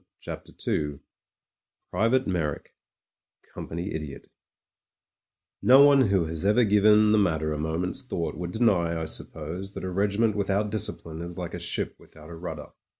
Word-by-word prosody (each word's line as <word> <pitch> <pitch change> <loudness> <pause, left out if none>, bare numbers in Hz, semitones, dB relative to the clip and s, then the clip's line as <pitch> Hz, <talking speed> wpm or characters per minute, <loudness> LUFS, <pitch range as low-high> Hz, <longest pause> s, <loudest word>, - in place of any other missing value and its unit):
CHAPTER - - -8 0.2
II 75 -2 -1 0.9
PRIVATE 115 +8 +2
MEYRICK 80 -6 -3 0.8
COMPANY 85 +5 -5
IDIOT 75 -3 -7 1.3
NO 130 +7 +8
one 140 -1 +6
who 95 -4 +2
has 80 +1 -2
ever 105 +5 +4
given 105 0 +5
the 110 - +4
matter 80 -5 +1
a 75 - -4
moment's 80 - -2
thought 85 - -3
would 90 +1 -5
deny, 90 -8 +2
I 80 - -3
suppose, 85 +5 -5
that - - -6
a 95 - -3
regiment 100 +3 +1
without 100 +1 0
discipline 85 -6 -3
is 85 0 -7
like 90 -2 -5
a 90 - -4
ship 85 - -2
without 80 +1 -14
a - - -7
rudder. 80 -3 -7
90 Hz, 150 wpm, -26 LUFS, 80-105 Hz, 1.3 s, NO